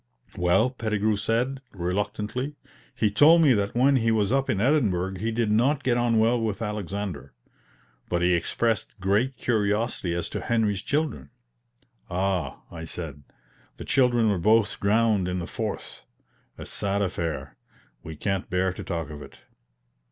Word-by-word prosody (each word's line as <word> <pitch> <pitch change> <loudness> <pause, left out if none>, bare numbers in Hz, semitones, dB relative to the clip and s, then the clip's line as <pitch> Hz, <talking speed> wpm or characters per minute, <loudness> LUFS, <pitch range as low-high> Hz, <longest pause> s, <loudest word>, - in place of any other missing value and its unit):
"Well," 90 +8 +2
Pettigrew 110 -3 0
said, 120 +6 -1
reluctantly, 105 +9 -3 0.4
"he 105 -2 +1
told 160 +10 +6
me 140 -4 +6
that 100 +1 -1
when 135 +3 +4
he 115 -2 +1
was 110 -2 +2
up 135 0 +1
in 95 - +1
Edinburgh 100 - +1
he 115 +4 -1
did 115 -1 0
not 130 +7 +2
get 125 -2 +2
on 120 -1 +2
well 115 +2 +3
with 110 -3 -2
Alexander. 100 - -4 0.7
But 85 0 0
he 90 0 +4
expressed 110 +5 -1
great 105 +8 +1
curiosity 105 -5 0
as 85 - -2
to - - -4
Henry's 110 -5 0
children." 145 - -2 0.8
"Ah," 95 0 -2
I 80 -1 -7
said, 80 -4 -6 0.6
"the - - -8
children 120 -4 +3
were 95 - 0
both 110 +4 +3
drowned 105 -2 +2
in 90 0 -2
the 85 - -3
Forth; 110 +3 -5 0.5
a - - -8
sad 100 0 -1
affair 80 -7 -3 0.5
we 80 +4 -8
can't 95 +4 -2
bear 90 0 +1
to - - -7
talk 85 -3 -4
of 75 -1 -8
it." - - -12
105 Hz, 155 wpm, -26 LUFS, 90-115 Hz, 0.8 s, told